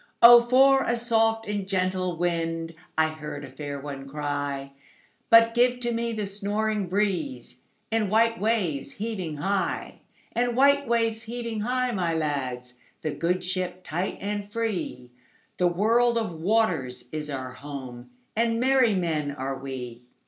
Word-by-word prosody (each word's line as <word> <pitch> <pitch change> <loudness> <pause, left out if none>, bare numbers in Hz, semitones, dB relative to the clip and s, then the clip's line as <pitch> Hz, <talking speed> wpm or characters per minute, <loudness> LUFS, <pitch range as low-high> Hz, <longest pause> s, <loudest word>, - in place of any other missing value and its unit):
"O 240 0 +11
for 270 +1 +6
a 235 -2 0
soft 225 -2 +1
and 205 -2 -2
gentle 185 -2 0
wind!"I 165 -2 -1
heard 150 -2 -7
a 135 - -12
fair 145 -1 -6
one 135 -1 -7
cry:But 145 - 0
give 245 +1 +3
to 240 -1 0
me 235 0 -1
the 215 -2 -2
snoring 205 0 -2
breezeAnd 210 - -2
white 230 +2 +3
waves 195 -10 0
heaving 195 -8 -4
high; 190 +5 -2 0.3
And 240 +1 0
white 280 0 +4
waves 225 -1 +1
heaving 230 -1 -4
high, 250 +3 0
my 175 -6 0
lads, 130 -5 -3 0.2
The 155 - -1
good 180 +4 -1
ship 185 0 -3
tight 175 +4 -3
and 205 0 -4
free—The 175 - -4
world 230 +7 +3
of 225 -5 -1
waters 160 - 0
is 150 -1 -5
our 130 -2 -5
home, 130 -3 -8 0.3
And 230 +1 +1
merry 255 -4 +4
men 160 -5 -1
are 135 -1 -4
we. 125 -3 -6
190 Hz, 135 wpm, -26 LUFS, 145-230 Hz, 0.3 s, O